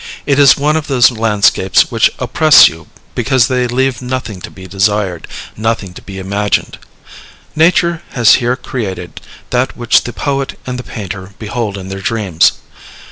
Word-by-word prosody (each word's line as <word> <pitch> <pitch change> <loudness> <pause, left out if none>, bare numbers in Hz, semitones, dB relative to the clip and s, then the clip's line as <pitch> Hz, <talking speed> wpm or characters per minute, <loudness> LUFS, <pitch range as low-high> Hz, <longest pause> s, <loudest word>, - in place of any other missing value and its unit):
It 140 -1 +1
is 140 -2 +6
one 150 +2 +1
of 160 -2 -2
those 130 -3 +4
landscapes 105 -4 +2
which - - +3
oppress 155 -2 +6
you 80 0 -8 0.3
because 125 0 +2
they 125 -1 0
leave 130 0 -1
nothing 125 -6 -5
to - - -8
be 95 - -13
desired, 95 -2 -1 0.3
nothing 110 -4 -2
to - - -11
be 95 -1 -10
imagined. 100 +1 -2 0.8
Nature 170 +1 +2
has 120 -4 +5
here 120 +1 0
created 95 - -6 0.3
that 125 +1 -1
which 120 -2 +2
the 120 - -4
poet 135 +1 -3
and 125 -1 -4
the - - -6
painter 95 -3 -8
behold 105 -1 -4
in 95 -1 -8
their 95 0 -6
dreams. 95 -6 +1
115 Hz, 160 wpm, -14 LUFS, 95-130 Hz, 0.8 s, is